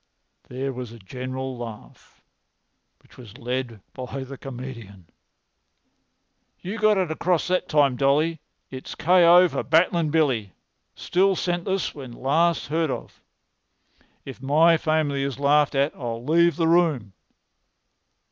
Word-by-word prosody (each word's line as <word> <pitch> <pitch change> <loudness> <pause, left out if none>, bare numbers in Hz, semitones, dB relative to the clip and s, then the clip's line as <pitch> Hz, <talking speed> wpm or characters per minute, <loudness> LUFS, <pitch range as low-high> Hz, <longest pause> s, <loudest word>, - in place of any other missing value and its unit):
There 135 +2 -4
was 125 -2 -7
a 115 - -11
general 130 +5 -6
laugh, 115 -3 -11 0.8
which - - -22
was 120 -2 -13
led 125 -3 -4
by 130 +1 -6
the 135 +1 -9
comedian. 120 -9 -9 1.5
"You 205 +5 -6
got 215 -1 +3
it 185 -4 0
across 170 +1 0
that 185 0 0
time, 140 -4 +3
Dolly. 145 +4 +1 0.3
It's 130 -1 -8
K.O. 175 +1 +5
for - - -3
Battling 165 0 +2
Billy—still 155 - -1
senseless 180 +2 -2
when 130 -4 -9
last 160 +7 +1
heard 160 0 0
of. - - -7 1.0
If 135 -2 -10
my 155 +5 +4
family 155 -3 0
is 135 -2 -3
laughed 145 +1 +3
at 140 +2 +1
I'll 120 -2 -6
leave 170 +3 +3
the 165 -1 0
room." 160 - +1
140 Hz, 125 wpm, -24 LUFS, 125-165 Hz, 1.5 s, K.O